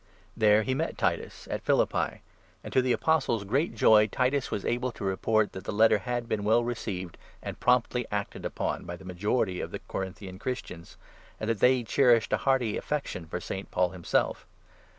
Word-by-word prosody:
There 110 -1 +4
he 130 - -1
met 160 +5 -2
Titus - - -2
at - - -2
Philippi; - - +1 0.4
and - - -8
to 130 - +5
the 125 0 0
Apostle's 130 -8 +1
great 130 - 0
joy 105 -1 +6
Titus 130 +5 0
was 100 - -3
able 125 +2 0
to - - -8
report 105 +2 +1
that 95 - -8
the - - -3
Letter 110 0 +4
had 120 0 -3
been 105 -2 -1
well 110 +3 +3
received, 100 -7 -4 0.2
and - - -6
promptly 125 -1 +2
acted 100 -1 -3
upon, - - -3
by 85 - -5
the 95 - -14
majority 95 +1 -1
of - - -4
the - - -6
Corinthian 95 0 -6
Christians, 105 -9 -6 0.4
and 110 - -3
that 110 - -2
they 125 +2 +4
cherished 120 -1 +3
a - - +4
hearty 130 -5 +1
affection 140 - -3
for 90 - -4
St. 95 +2 -6
Paul 90 0 +1
himself. 90 -1 -1
110 Hz, 185 wpm, -28 LUFS, 95-125 Hz, 0.4 s, joy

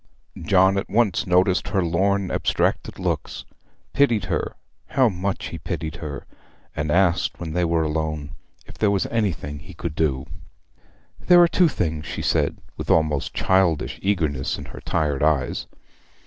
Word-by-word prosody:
John 95 0 +4
at - - -6
once 105 -5 +1
noticed 90 +1 +3
her 95 -3 +1
lorn, 95 +3 +1
abstracted - - 0
looks, - - -3 0.5
pitied 120 -9 +3
her, 90 - -2 0.3
how 130 -3 +3
much 95 0 -3
he 85 - -7
pitied 80 0 -4
her! 75 -4 -6 0.5
and 75 0 -2
asked 90 +1 +2
when 80 -3 -5
they 90 +1 +1
were 85 -1 +1
alone 75 -1 -2 0.3
if - - -14
there 105 - +3
was 100 -2 +1
anything 85 -10 -2
he 90 +2 -13
could 80 -1 -4
do. 70 -4 0 0.9
'There 175 -1 +6
are - - +6
two 175 +1 +4
things,' 80 - -2
she - - -4
said, - - +1 0.2
with - - -6
almost 75 -3 +1
childish 95 -5 +1
eagerness 80 -9 0
in - - -8
her - - -9
tired 75 -5 -1
eyes. 75 -4 +1
85 Hz, 155 wpm, -23 LUFS, 75-95 Hz, 0.9 s, There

